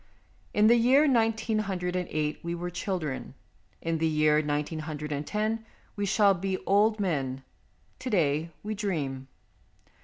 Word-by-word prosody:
In 210 - +3
the 235 +2 +7
year 260 +6 +5
nineteen 225 -3 +2
hundred 180 -3 -2
and 180 -1 -1
eight 150 0 -1
we 170 0 -3
were 175 +1 -4
children; 175 -7 -3 0.5
in 165 -1 -1
the 160 - +2
year 155 -1 +3
nineteen 150 +1 -2
hundred 150 -1 -5
and 145 0 -3
ten 215 +1 -1 0.3
we 205 -1 -1
shall 200 0 +4
be 190 +1 -2
old 210 +2 +3
men; 135 -9 -1 0.6
to 255 0 -4
day, 160 - +1
we 215 +1 -3
dream. 150 -11 -3
180 Hz, 155 wpm, -28 LUFS, 150-215 Hz, 0.6 s, the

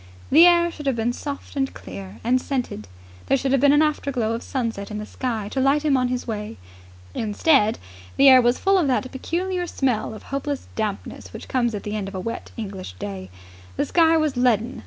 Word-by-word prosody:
The 330 +5 +8
air 345 -1 +4
should 295 -3 -8
have 270 - +2
been 230 +1 0
soft 280 +2 -7
and 270 -1 0
clear 95 +2 -9
and 255 +2 +2
scented: 250 - -3 0.4
there 275 - +3
should 265 0 -1
have 270 -2 +3
been 285 0 +6
an 295 +2 +5
afterglow 275 -7 -1
of 230 - -3
sunset 230 -6 -3
in 210 - -5
the 210 - -5
sky 225 -3 -3
to 270 - -2
light 275 +3 +2
him 290 -3 +3
on 255 -1 +2
his 250 0 -3
way. 215 -1 -5 0.6
Instead, 220 +1 +2 0.4
the 275 - +6
air 260 -1 +9
was 240 +1 +2
full 390 -1 +3
of 325 - +1
that 255 0 0
peculiar 355 +6 -2
smell 245 -8 -1
of - - -11
hopeless 280 0 -4
dampness 210 -3 -4
which - - -9
comes 240 -3 0
at 205 - -5
the 210 0 -4
end 205 -2 -3
of 195 - -8
a - - -3
wet 230 +5 -5
English 195 - -6
day. 95 0 -7 0.5
The - - 0
sky 330 -1 +4
was 310 -3 0
leaden. 245 -1 +1
250 Hz, 215 wpm, -23 LUFS, 215-280 Hz, 0.6 s, air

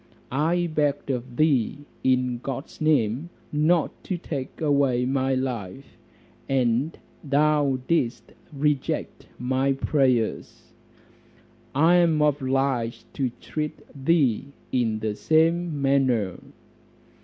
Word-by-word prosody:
I 165 +6 +1
begged 145 -2 0
of 125 -1 -4
thee 145 -1 +1 0.2
in 125 -2 +1
God's 135 +4 -6
name 145 -1 +1 0.2
not 155 +2 +1
to 185 - -2
take 140 -6 -6
away 140 -5 +2
my 135 0 +1
life, 130 -2 -4 0.5
and 130 +3 +1 0.3
thou 145 -1 +2
didst 145 -8 0 0.2
reject 145 -1 -1
my 130 +2 +1
prayers; 130 -5 0 1.0
I 165 +5 +5
am 165 -3 +3
obliged 130 -5 0
to 135 -2 -1
treat 150 -1 -4 0.2
thee 140 -4 +1 0.2
in 115 -4 +1
the 110 -1 -1
same 160 +4 +2
manner." 130 -8 +1
135 Hz, 100 wpm, -25 LUFS, 125-150 Hz, 1.0 s, I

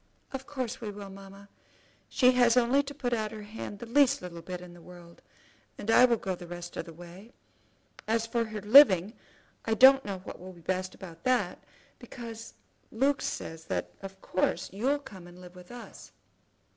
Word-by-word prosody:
"Of 270 0 -6
course 255 -5 -4
we 220 - -4
will, 200 -1 -8
mamma. 195 +1 -13 0.6
She 250 -1 +5
has 245 -1 +4
only 250 +3 +4
to 285 0 -8
put 250 -4 -2
out 215 -2 -1
her 215 -1 -8
hand 210 -1 -7
the 235 - -8
least 275 +3 +3
little 170 -2 -8
bit 180 +1 -6
in 180 -1 -12
the 175 - -15
world, 175 -1 -14 0.6
and 220 - -2
I 250 - +8
will 235 -2 +2
go 195 -3 -3
the 175 -1 -9
rest 175 0 -8
of - - -4
the 165 - -10
way. 175 +6 -13 0.7
As 225 +1 +1
for 230 0 -1
her 215 -1 -6
living, 210 -4 +7 0.5
I 225 - +1
don't 265 +3 +8
know 200 -2 -4
what - - -9
will 185 +1 -10
be 170 - -16
best 185 +2 -3
about 165 -4 -12
that, 255 -1 0 0.4
because 230 -2 -9 0.4
Luke 270 +5 +1
says 160 0 -5
that - - -3
of 195 0 -9
course 185 - -1
you'll 255 +9 +1
come 190 -11 -12
and 175 +1 -14
live 180 -1 -12
with 180 -1 -14
us." 245 -1 -11
210 Hz, 195 wpm, -29 LUFS, 180-245 Hz, 0.7 s, I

